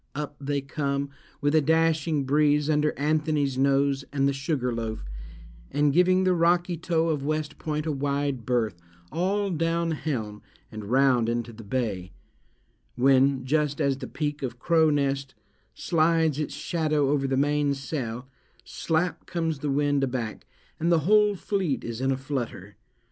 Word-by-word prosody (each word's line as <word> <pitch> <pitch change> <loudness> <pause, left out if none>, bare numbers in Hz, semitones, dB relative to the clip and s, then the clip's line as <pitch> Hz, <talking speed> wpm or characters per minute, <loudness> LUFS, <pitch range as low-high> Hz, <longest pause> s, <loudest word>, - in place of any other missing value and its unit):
Up 145 0 -4
they 140 0 -1
come, 140 0 -2 0.3
with 145 +1 +1
a 155 - +5
dashing 160 -1 +2
breeze, 150 +2 +2
under 150 0 +2
Anthony's 150 -2 0
Nose, 140 0 +2
and 140 -1 +1
the 140 - +1
Sugar 135 -2 -1
Loaf, 110 - -4 0.6
and 145 -1 +2
giving 185 +3 +4
the 185 -1 +3
rocky 175 +1 +2
toe 165 0 0
of 150 -4 -1
West 155 +1 -2
Point 150 -1 -3
a 160 - 0
wide 140 -2 -1
berth, 110 -7 -1 0.3
all 195 +3 0
down 165 0 0
helm, 120 -10 -3 0.3
and 110 -2 -7
round 125 0 +3
into 120 0 -2
the 115 +1 -11
bay; 100 -5 -3 0.8
when—just 135 +3 +2
as 140 -3 +1
the 130 - -6
peak 150 -1 -3
of 125 -3 -4
Crow 160 +4 +3
Nest 140 -2 -1 0.4
slides 160 -3 +2
its 150 - -3
shadow 155 -4 0
over 140 -2 +1
the 135 0 0
mainsail—slap 140 +3 -2
comes 165 -4 -2
the 145 - -2
wind 145 0 +1
aback, 125 -4 -3 0.3
and 170 +2 +1
the 165 -2 +4
whole 210 +4 +4
fleet 190 -7 -1
is 115 +1 -5
in 135 0 +1
a 130 - 0
flutter. 120 -7 -5
145 Hz, 150 wpm, -26 LUFS, 135-160 Hz, 0.8 s, a